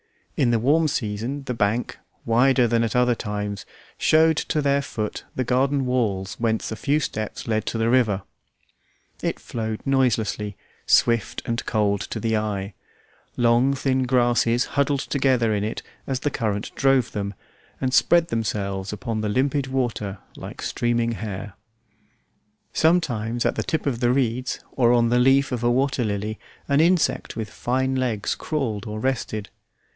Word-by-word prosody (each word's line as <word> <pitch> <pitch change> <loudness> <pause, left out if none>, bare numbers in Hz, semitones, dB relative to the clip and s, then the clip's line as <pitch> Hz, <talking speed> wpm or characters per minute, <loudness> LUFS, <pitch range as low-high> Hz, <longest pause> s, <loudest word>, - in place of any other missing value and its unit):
In 125 - +2
the 120 - +3
warm 150 +8 +3
season 120 +1 -3
the 125 - -3
bank, 115 +2 -1 0.3
wider 125 +2 +4
than 115 0 +2
at 115 - -2
other 125 0 +4
times, 105 -2 -4 0.3
showed 160 0 +4
to 155 - -1
their 140 -1 +2
foot 110 -5 -4
the 130 - 0
garden 135 +2 +1
walls 105 -5 -1
whence 110 -1 0
a - - -2
few 145 +6 +1
steps 110 -7 -4
led 110 -1 0
to - - -1
the 115 +1 +1
river. 110 -7 +2 1.0
It - - -2
flowed 110 -2 -4
noiselessly, 115 -6 +1 0.3
swift, 115 -3 +2
and 115 +1 -2
cold 100 -3 +1
to 110 - -5
the 110 +1 0
eye; 100 -2 -3 0.6
long, 120 +3 +3
thin 130 -1 0
grasses 120 -1 +3
huddled 140 0 +1
together 130 -5 +1
in 105 -1 0
it 110 - -4 0.2
as 130 -1 -2
the 145 - 0
current 105 -5 -2
drove 135 -3 +2
them, 100 -1 -4 0.4
and 130 -1 -1
spread 170 +2 +4
themselves 100 -4 -2
upon 110 +1 -3
the 105 - -1
limpid 135 +4 +1
water 120 -7 -2 0.2
like - - -8
streaming 120 0 0
hair; 105 -2 -5 1.2
sometimes 120 -9 +1
at - - +2
the - - -2
tip 160 - -2
of 130 -5 -1
the 120 -1 +3
reeds 125 -1 0
or 120 -3 +3
on 120 -1 +3
the 120 +1 +3
leaf 135 +1 +4
of 125 -2 -2
a 120 - +3
water 130 +1 +1
lily 105 0 -3 0.3
an 140 +2 +3
insect 175 +1 +2
with 110 -2 -5
fine 130 +2 -1
legs 120 -6 0
crawled 115 -9 -3
or 105 0 -4
rested. 110 -5 -2
120 Hz, 160 wpm, -23 LUFS, 110-135 Hz, 1.2 s, wider